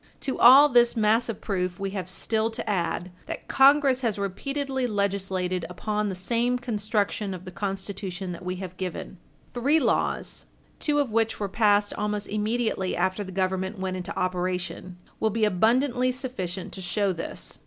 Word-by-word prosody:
To 265 - -3
all 265 +5 +9
this 240 -3 +4
mass 220 +2 +3
of 225 - -4
proof 180 -3 -2
we 195 -1 -2
have 185 -2 -4
still 220 +3 0
to 225 - -6
add, 180 -2 -1 0.2
that - - -6
Congress 275 -1 +5
has 225 -5 0
repeatedly 265 +7 -2
legislated 190 -4 -1
upon 210 +3 -2
the 190 - -3
same 235 +6 0
construction 210 -4 -1
of 180 +1 -10
the 185 - -7
Constitution 195 -1 -4
that 170 - -8
we 180 0 -3
have 185 -1 -7
given. 185 0 -5 0.3
Three 280 +6 +3
laws, - - -1 0.3
two 295 -1 +1
of 285 -5 +1
which 225 0 +1
were 205 - -1
passed 205 0 +2
almost 210 0 -2
immediately 215 -2 -1
after 185 +3 0
the 190 - -8
Government 190 +2 -1
went 190 -1 -3
into 185 +2 -5
operation, 180 0 -2 0.2
will 220 - +2
be 220 +1 +1
abundantly 245 +6 +2
sufficient 200 -9 -5
to 190 - -6
show 195 +1 0
this. 165 - -6
205 Hz, 165 wpm, -26 LUFS, 185-235 Hz, 0.3 s, all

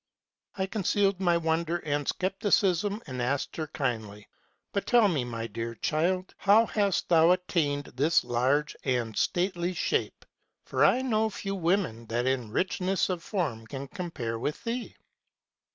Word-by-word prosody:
" - - -43
I 190 - 0
concealed 195 -1 +1
my 175 -3 +3
wonder 165 +1 0
and 145 -1 -1
scepticism, 195 +1 +1
and 130 -5 -5
asked 135 +3 -1
her 155 -1 -2
kindly, 110 -8 -3
k - - -25 0.5
But 200 - -2
tell 240 -3 +5
me, 155 -9 0
my 115 -2 -4
dear 115 +1 -5
child, 180 - 0
how 210 +3 +5
hast 200 -4 0
thou 165 -1 +5
attained 165 -6 +1
this 155 +5 +3
large 130 +5 +1
and 120 -5 -1
stately 180 0 0
shape? - - -1 0.4
For - - +1
I 260 - +4
know 220 -3 +1
few 195 -1 -5
women 170 - 0
that 120 +2 -1
in 130 -4 0
richness 185 - 0
of 180 -2 -2
form 145 - -3
can 135 +3 -6
compare 135 - -4
with 150 - -3
thee.' 235 +1 -4
165 Hz, 155 wpm, -28 LUFS, 130-195 Hz, 0.5 s, tell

